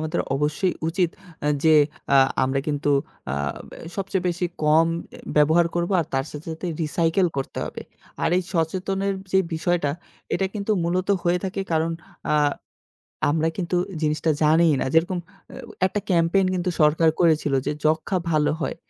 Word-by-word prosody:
আমাদের 155 Hz, 0 st, -1 dB
অবশ্যই 150 Hz, +6 st, 0 dB
উচিত 175 Hz, 0 st, +1 dB, 0.3 s
আ -, -, +2 dB, 0.2 s
যে 160 Hz, -, +6 dB, 0.4 s
আ -, -, +7 dB, 0.3 s
আমরা 135 Hz, +1 st, 0 dB
কিন্তু 145 Hz, 0 st, 0 dB, 0.4 s
আ -, -, 0 dB, 0.4 s
ব্যা -, -, -11 dB, 0.2 s
সবচেয়ে 195 Hz, -1 st, -2 dB
বেশি 175 Hz, +1 st, -1 dB, 0.2 s
কম 155 Hz, +2 st, +5 dB, 0.2 s
অ্যা -, -, -14 dB, 0.2 s
ব্যবহার 160 Hz, +3 st, +5 dB
করব 175 Hz, +1 st, -1 dB
আর 160 Hz, -, -3 dB
তার 135 Hz, 0 st, +1 dB
সাথে, 150 Hz, +2 st, -9 dB
সাথে 160 Hz, +3 st, -6 dB, 0.2 s
রিসাইকেল 165 Hz, +4 st, +1 dB
করতে 135 Hz, -, -4 dB
হবে। -, -, -7 dB, 0.4 s
আর -, -, +3 dB
এই 185 Hz, -, +1 dB
সচেতনের 190 Hz, +3 st, -1 dB, 0.2 s
যে 190 Hz, -, +5 dB, 0.2 s
বিষয়টা 160 Hz, -2 st, 0 dB, 0.4 s
এটা 195 Hz, -, +1 dB
কিন্তু 205 Hz, 0 st, -3 dB
মূলত 180 Hz, +2 st, -1 dB
হয়ে 175 Hz, +1 st, +2 dB
থাকে 190 Hz, +1 st, -3 dB
কারণ 160 Hz, +1 st, +1 dB, 0.4 s
আ -, -, +3 dB, 1.0 s
আমরা 160 Hz, +1 st, +1 dB
কিন্তু 180 Hz, -1 st, -1 dB, 0.3 s
জিনিসটা 155 Hz, +1 st, +1 dB
জানিই 160 Hz, +1 st, +5 dB
না। -, -, 0 dB
যেরকম 175 Hz, +3 st, +2 dB
অ্যা 195 Hz, 0 st, -7 dB
একটা 205 Hz, +2 st, -2 dB
ক্যাম্পেইন 175 Hz, +2 st, +3 dB
কিন্তু 180 Hz, 0 st, -1 dB
সরকার 155 Hz, +2 st, +4 dB
করেছিল 160 Hz, -4 st, +3 dB
যে -, -, +1 dB
যক্ষা 160 Hz, +5 st, +1 dB
ভালো 150 Hz, -2 st, +2 dB
হয়। -, -, -2 dB
165 Hz, 160 wpm, -23 LUFS, 155-185 Hz, 1.0 s, আ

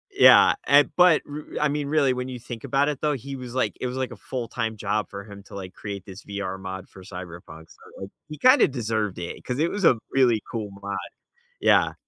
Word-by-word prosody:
Yeah, 400 Hz, -, +8 dB
and, 145 Hz, 0 st, +6 dB
but 180 Hz, -3 st, +6 dB
r 150 Hz, +1 st, -5 dB, 0.2 s
I 150 Hz, -, +4 dB
mean, 145 Hz, 0 st, -2 dB
really, 140 Hz, -3 st, +3 dB
when 125 Hz, +1 st, -4 dB
you 125 Hz, -1 st, -6 dB
think 120 Hz, -1 st, -8 dB
about 140 Hz, +1 st, +1 dB
it 145 Hz, -, -3 dB
though, 150 Hz, -1 st, +1 dB
he 135 Hz, +2 st, -6 dB
was, 125 Hz, -2 st, -8 dB
like 130 Hz, -, 0 dB
it 125 Hz, -, -1 dB
was, 125 Hz, -, -5 dB
like, 130 Hz, -1 st, -2 dB
a -, -, -7 dB
full-time 115 Hz, -3 st, -4 dB
job 105 Hz, +1 st, -1 dB
for 100 Hz, 0 st, -7 dB
him 100 Hz, -1 st, -11 dB
to, -, -, -11 dB
like, 95 Hz, -2 st, -7 dB
create 100 Hz, -3 st, -7 dB
this 95 Hz, 0 st, -11 dB
VR 100 Hz, -2 st, -4 dB
mod 95 Hz, 0 st, -7 dB
for 95 Hz, -, -14 dB
Cyberpunk, 85 Hz, -4 st, -10 dB
so 95 Hz, -, -11 dB, 0.2 s
he 150 Hz, -, -7 dB
kinda 255 Hz, +3 st, +6 dB
deserved 110 Hz, -7 st, -2 dB
it, 85 Hz, 0 st, -6 dB
'cause 125 Hz, +2 st, -3 dB
it 165 Hz, -, +2 dB
was 205 Hz, 0 st, -3 dB
a 125 Hz, -, +6 dB, 0.2 s
really 120 Hz, -5 st, +4 dB
cool 110 Hz, -4 st, -3 dB
mod. 100 Hz, 0 st, -4 dB, 0.6 s
Yeah. -, -, +4 dB
115 Hz, 225 wpm, -25 LUFS, 100-140 Hz, 0.6 s, Yeah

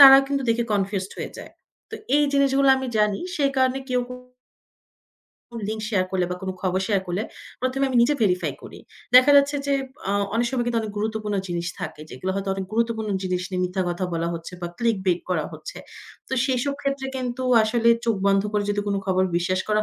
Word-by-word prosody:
তারা 270 Hz, -1 st, +12 dB
কিন্তু 275 Hz, -1 st, -1 dB
দেখে 230 Hz, +1 st, +2 dB
কনফিউজড 195 Hz, -1 st, -1 dB
হয়ে -, -, -4 dB
যায়। -, -, -9 dB, 0.4 s
তো -, -, -5 dB, 0.2 s
এই 295 Hz, -, +4 dB
জিনিসগুলো 275 Hz, -1 st, +3 dB
আমি 265 Hz, 0 st, -3 dB
জানি। 210 Hz, -1 st, +2 dB, 0.2 s
সেই 280 Hz, -2 st, +2 dB
কারণে 260 Hz, 0 st, +2 dB
কেউ, 250 Hz, -, +2 dB
কেউ 250 Hz, 0 st, -7 dB, 1.5 s
লিঙ্ক 215 Hz, 0 st, -3 dB
শেয়ার 200 Hz, -5 st, +1 dB
করলে, 185 Hz, -2 st, +1 dB
বা 180 Hz, -, -2 dB
কোন 190 Hz, -, -2 dB
খবর 185 Hz, 0 st, +1 dB
শেয়ার 200 Hz, -3 st, +2 dB
করলে। 180 Hz, +4 st, -1 dB, 0.4 s
১ম 255 Hz, +2 st, -1 dB
এ -, -, +3 dB
আমি 255 Hz, -, 0 dB
নিজে 295 Hz, +5 st, +3 dB
ভেরিফাই 180 Hz, -3 st, +1 dB
করি। -, -, -10 dB, 0.4 s
দেখা 255 Hz, +3 st, +8 dB
যাচ্ছে, 280 Hz, +1 st, +4 dB
যে 280 Hz, -, +1 dB, 0.4 s
আ -, -, +1 dB, 0.2 s
অনেক 235 Hz, +1 st, +2 dB
সময় 250 Hz, -2 st, 0 dB
কিন্তু 235 Hz, -1 st, +1 dB
অনেক 210 Hz, -1 st, -5 dB
গুরুত্বপূর্ণ 215 Hz, -1 st, -2 dB
জিনিস 170 Hz, 0 st, -2 dB
থাকে। -, -, -6 dB
যেগুলা 185 Hz, +9 st, -3 dB
হয়তো 195 Hz, 0 st, -3 dB
অনেক 195 Hz, -1 st, -3 dB
গুরুত্বপূর্ণ 225 Hz, -1 st, 0 dB
জিনিস 185 Hz, -1 st, -1 dB
নিয়ে 185 Hz, -1 st, -1 dB
মিথ্যা 185 Hz, +1 st, -1 dB
কথা 175 Hz, +1 st, -2 dB
বলা 165 Hz, 0 st, -1 dB
হচ্ছে, 165 Hz, +2 st, -7 dB
বা 175 Hz, -, -2 dB
clickbait 190 Hz, -7 st, +1 dB
করা 160 Hz, -4 st, +1 dB
হচ্ছে। -, -, -9 dB, 0.5 s
তো -, -, -8 dB
সেসব 265 Hz, +1 st, 0 dB
ক্ষেত্রে 275 Hz, -1 st, -1 dB
কিন্তু 255 Hz, 0 st, -3 dB, 0.2 s
আসলে 230 Hz, +1 st, +2 dB, 0.2 s
চোখ 230 Hz, -2 st, +1 dB
বন্ধ 195 Hz, 0 st, +4 dB
করে 210 Hz, -1 st, +1 dB
যদি 205 Hz, 0 st, 0 dB
কোন 200 Hz, -1 st, 0 dB
খবর 185 Hz, 0 st, +2 dB
বিশ্বাস 185 Hz, +2 st, 0 dB
করা 215 Hz, 0 st, +2 dB
215 Hz, 205 wpm, -24 LUFS, 190-255 Hz, 1.5 s, তারা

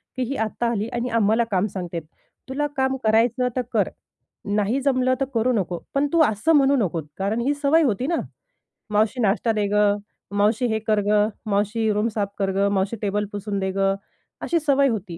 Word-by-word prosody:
की 255 Hz, -, -1 dB
ही 275 Hz, -, -2 dB
आत्ता 235 Hz, +2 st, -2 dB
आली 215 Hz, -1 st, -1 dB
आणि 240 Hz, +1 st, -2 dB
आम्हाला 220 Hz, +2 st, +3 dB
काम 190 Hz, +1 st, +2 dB
सांगते. 175 Hz, -3 st, -4 dB, 0.5 s
तुला 295 Hz, +3 st, -1 dB
काम 265 Hz, 0 st, +1 dB
करायचं 225 Hz, +3 st, +3 dB
तर 255 Hz, -, +1 dB
कर, -, -, +2 dB, 0.7 s
नाही 210 Hz, +5 st, +1 dB
जमलं 255 Hz, -2 st, +2 dB
तर 270 Hz, -, +1 dB
करू 235 Hz, +2 st, +2 dB
नको, 185 Hz, -5 st, -1 dB
पण 280 Hz, +1 st, +2 dB
तू 335 Hz, -, +5 dB
असं 220 Hz, +10 st, +1 dB
म्हणू 280 Hz, -1 st, +4 dB
नकोस. 165 Hz, -3 st, -4 dB
कारण 205 Hz, +4 st, -1 dB
ही 275 Hz, +4 st, +1 dB
सवय 290 Hz, +3 st, +3 dB
होती 250 Hz, -1 st, 0 dB
ना? 340 Hz, -, +1 dB, 0.8 s
"मावशी, 215 Hz, +4 st, +1 dB
नाश्ता 215 Hz, +2 st, +2 dB
दे 210 Hz, -2 st, 0 dB
गं, 205 Hz, 0 st, +3 dB, 0.4 s
मावशी 215 Hz, +4 st, +2 dB
हे 220 Hz, -, 0 dB
कर 215 Hz, -1 st, +3 dB
गं, 210 Hz, 0 st, +3 dB, 0.2 s
मावशी 210 Hz, +2 st, +1 dB
रूम 210 Hz, +2 st, +1 dB
साफ 205 Hz, -2 st, -1 dB
कर 195 Hz, -1 st, +1 dB
गं, 200 Hz, +1 st, +2 dB
मावशी 195 Hz, +3 st, 0 dB
टेबल 205 Hz, 0 st, 0 dB
पुसून 205 Hz, 0 st, -3 dB
दे 190 Hz, 0 st, -1 dB
गं," 195 Hz, 0 st, +1 dB, 0.5 s
अशी 340 Hz, -, +1 dB
सवय 280 Hz, -2 st, +3 dB
होती. 195 Hz, -7 st, -4 dB
215 Hz, 195 wpm, -23 LUFS, 200-255 Hz, 0.8 s, तू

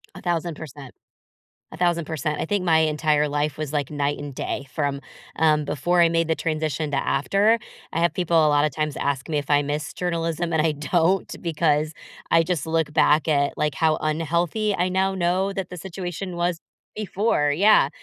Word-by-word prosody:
1,000%. 160 Hz, -6 st, -4 dB, 0.8 s
1,000%. 160 Hz, -4 st, -1 dB
I -, -, -1 dB
think 200 Hz, +2 st, -1 dB
my 160 Hz, -2 st, +4 dB
entire 150 Hz, -1 st, +2 dB
life 145 Hz, 0 st, -1 dB
was, 155 Hz, -2 st, -4 dB
like, 145 Hz, -3 st, -1 dB
night 145 Hz, -1 st, -1 dB
and 145 Hz, -2 st, -7 dB
day 140 Hz, -, -4 dB
from, 140 Hz, -3 st, -1 dB, 0.4 s
um, 155 Hz, -1 st, +3 dB
before 175 Hz, +6 st, +1 dB
I 170 Hz, -, +5 dB
made 165 Hz, 0 st, +1 dB
the 160 Hz, -, +1 dB
transition 155 Hz, -1 st, -2 dB
to 140 Hz, -, 0 dB
after. 200 Hz, +11 st, +2 dB, 0.4 s
I 165 Hz, -, 0 dB
have 170 Hz, -, +2 dB
people 175 Hz, -3 st, 0 dB
a 150 Hz, -, +4 dB
lotta 145 Hz, +1 st, +3 dB
times 150 Hz, +1 st, -3 dB
ask 140 Hz, -1 st, -2 dB
me 150 Hz, -, 0 dB
if 145 Hz, 0 st, -4 dB
I 145 Hz, 0 st, +4 dB
miss 145 Hz, +1 st, -3 dB
journalism, 170 Hz, -1 st, -2 dB
and 160 Hz, -, +3 dB
I 155 Hz, 0 st, +1 dB
don't 170 Hz, +5 st, +1 dB
because 155 Hz, -2 st, +1 dB, 0.4 s
I 165 Hz, 0 st, +5 dB
just 170 Hz, -2 st, -2 dB
look 160 Hz, -2 st, 0 dB
back 150 Hz, +1 st, +3 dB
at, 140 Hz, -2 st, +1 dB
like, 150 Hz, -1 st, 0 dB
how 160 Hz, +1 st, +2 dB
unhealthy 170 Hz, +7 st, 0 dB
I 180 Hz, +1 st, 0 dB
now 190 Hz, +1 st, +1 dB
know 185 Hz, +2 st, 0 dB
that 195 Hz, -2 st, -4 dB
the 180 Hz, -, -8 dB
situation 180 Hz, 0 st, -6 dB
was 175 Hz, -1 st, -1 dB, 0.4 s
before 200 Hz, -7 st, 0 dB
Yeah, 200 Hz, -4 st, +5 dB
160 Hz, 180 wpm, -23 LUFS, 150-175 Hz, 0.8 s, I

